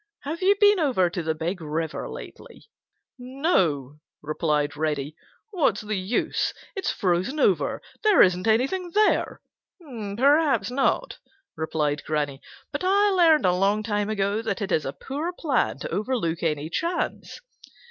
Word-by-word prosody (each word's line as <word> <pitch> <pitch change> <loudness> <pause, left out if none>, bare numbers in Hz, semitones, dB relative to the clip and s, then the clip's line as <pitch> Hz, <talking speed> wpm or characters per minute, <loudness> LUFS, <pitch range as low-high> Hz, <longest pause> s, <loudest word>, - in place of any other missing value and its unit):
Have 315 +5 -5
you 390 +2 +4
been 410 -2 +5
over 245 - +2
to 175 - -3
the 160 -1 -2
Big 170 +4 -3
River 160 +1 -3
lately?" - - -11 0.6
"No," 190 - 0 0.2
replied 150 -1 -1
Reddy. 150 -1 -2 0.4
"What's 305 - +1
the 215 0 -3
use? 190 +5 -1 0.2
It's 390 - -2
frozen 185 - -1
over. - - +1 0.2
There 425 -4 +6
isn't 185 +3 +1
anything 270 +12 +1
there." 425 0 +2 0.4
"Perhaps 270 - +1
not," 275 - 0 0.4
replied 150 -2 -1
Granny, 145 -3 -2 0.3
"but - - -4
I 400 +2 +3
learned 330 - +4
a 180 - +4
long 200 +3 +1
time 205 -1 -1
ago 205 0 0
that 220 -3 -3
it 200 -2 -3
is 155 - +1
a 135 - -4
poor 295 - -4
plan 290 -9 0
to - - -4
overlook 210 -8 -1
any 155 -2 -1
chance. 340 - -3
210 Hz, 145 wpm, -25 LUFS, -, 0.6 s, There